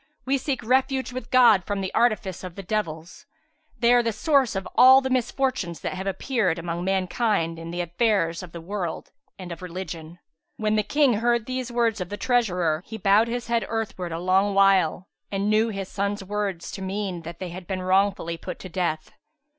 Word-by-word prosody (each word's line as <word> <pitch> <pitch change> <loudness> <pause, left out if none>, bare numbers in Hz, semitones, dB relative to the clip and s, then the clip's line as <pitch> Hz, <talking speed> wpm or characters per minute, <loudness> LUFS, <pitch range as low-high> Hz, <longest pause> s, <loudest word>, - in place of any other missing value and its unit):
We 270 +1 +1
seek 265 -2 -3
refuge 260 +2 +1
with 255 -2 -6
God 240 -7 +6
from 200 +1 -3
the 190 - -4
artifice 215 -6 +1
of 180 -2 -7
the 195 - -7
devils. 175 -5 -4 0.5
They 235 0 +4
are 245 - +6
the 230 -1 0
source 265 +1 +2
of 190 0 -3
all 260 +1 +8
the 265 -1 -3
misfortunes 255 -8 -1
that - - -3
have 190 +1 -5
appeared 195 -2 0
among 170 +1 -4
mankind 190 -2 0
in 165 0 -7
the 175 +1 -3
affairs 175 -1 0
of 180 -2 -10
the 170 - -8
world 180 -1 -5 0.3
and 180 -2 -8
of 170 - -7
religion.'''[FN#373] 170 -2 -7 0.4
When 215 0 0
the 215 - +3
King 275 +5 +2
heard 235 -1 +1
these 255 -1 -4
words 230 -4 +1
of 180 - -4
the 205 - -5
treasurer, 180 -11 +1
he 220 - -6
bowed 205 +2 +4
his 240 +1 -3
head 235 0 0
earthwards, 195 -7 -3
a - - -3
long 190 +3 +2
while 190 -3 +3 0.2
and 200 +1 0
knew 220 +2 +3
his 195 -3 -4
sons' 200 +1 -2
words 200 -3 -3
to 195 - -7
mean 190 -2 -3
that 165 +1 -8
they 185 0 -5
had 175 0 -9
been 185 -1 -3
wrongfully 185 -3 +1
put - - -7
to 185 - -9
death. 170 -3 -2
195 Hz, 200 wpm, -25 LUFS, 180-230 Hz, 0.5 s, all